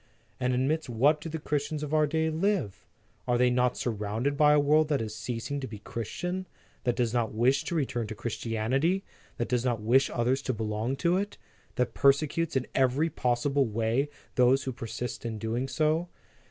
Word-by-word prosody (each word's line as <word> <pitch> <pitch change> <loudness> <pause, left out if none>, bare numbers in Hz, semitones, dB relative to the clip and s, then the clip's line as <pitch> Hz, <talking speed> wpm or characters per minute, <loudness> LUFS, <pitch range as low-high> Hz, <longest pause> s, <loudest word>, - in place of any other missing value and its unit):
And 125 0 +1
amidst 140 +4 0
what 140 +6 +3
do 165 - -5
the 160 - -3
Christians 150 0 -2
of 150 0 -4
our 155 -1 +4
day 160 +1 0
live? 170 - -1 0.4
Are 120 -1 +2
they 125 0 +4
not 125 0 +2
surrounded 110 +4 -1
by 150 0 +5
a 150 - +5
world 150 +2 +4
that 145 -3 +1
is 110 -1 -4
ceasing 115 +6 -4
to 130 - -4
be 110 - -8
Christian; 180 - -4 0.4
that 120 -1 +2
does 120 -2 0
not 115 -3 0
wish 130 +5 +3
to 170 - -2
return 120 -7 -1
to 110 - -6
Christianity, 120 - -1 0.3
that 120 - -1
does 125 -1 0
not 120 -3 0
wish 120 +6 +3
others 125 +3 0
to 130 - -2
belong 110 +3 -2
to 170 +5 +2
it, 200 +1 -3 0.4
that 125 -2 0
persecutes 150 +4 +2
in 130 -1 +1
every 135 +5 +2
possible 135 0 +1
way 115 +6 0 0.2
those 125 +2 +4
who 130 - -2
persist 120 0 -5
in 115 -2 -3
doing 115 +4 -2
so? 155 +5 +1
130 Hz, 190 wpm, -28 LUFS, 115-150 Hz, 0.4 s, by